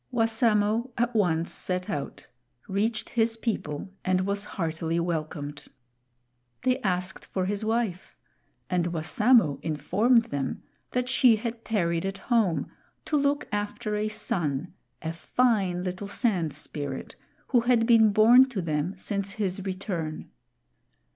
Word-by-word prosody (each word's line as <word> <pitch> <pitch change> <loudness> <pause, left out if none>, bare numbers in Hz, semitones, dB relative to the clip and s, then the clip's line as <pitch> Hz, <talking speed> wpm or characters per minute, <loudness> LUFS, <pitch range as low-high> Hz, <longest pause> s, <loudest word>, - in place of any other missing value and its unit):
Wassamo 225 0 +2
at 240 +1 +1
once 170 -6 +1
set 180 0 -2
out, 140 -1 -5 0.4
reached 215 +3 -1
his 225 -1 +1
people, 190 -8 -3
and 185 -1 +2
was 200 +2 -1
heartily 165 -3 -2
welcomed. 155 -3 -4 1.0
They 255 0 +2
asked 185 -1 -1
for 185 -1 -2
his 205 +2 -2
wife, 220 -5 -2 0.5
and 180 -2 0
Wassamo 175 - +3
informed 195 - +2
them 140 -2 -3 0.3
that 250 0 -1
she 250 -2 +5
had 230 +1 -5
tarried 170 -6 0
at 195 0 -4
home 215 -5 +1 0.3
to 305 - -1
look 285 0 +1
after 210 +1 -2
a 210 +1 0
son, 175 -7 -2 0.3
a 160 0 -2
fine 190 -2 +1
little 185 +2 -4
Sand 190 - 0
Spirit, 140 -3 -5 0.3
who 250 - +4
had 235 -1 +3
been 225 -2 +6
born 240 +5 +7
to 230 -7 -4
them 160 +4 -2
since 200 0 -2
his 195 -2 -2
return. 185 -5 -4
200 Hz, 130 wpm, -27 LUFS, 170-225 Hz, 1.0 s, born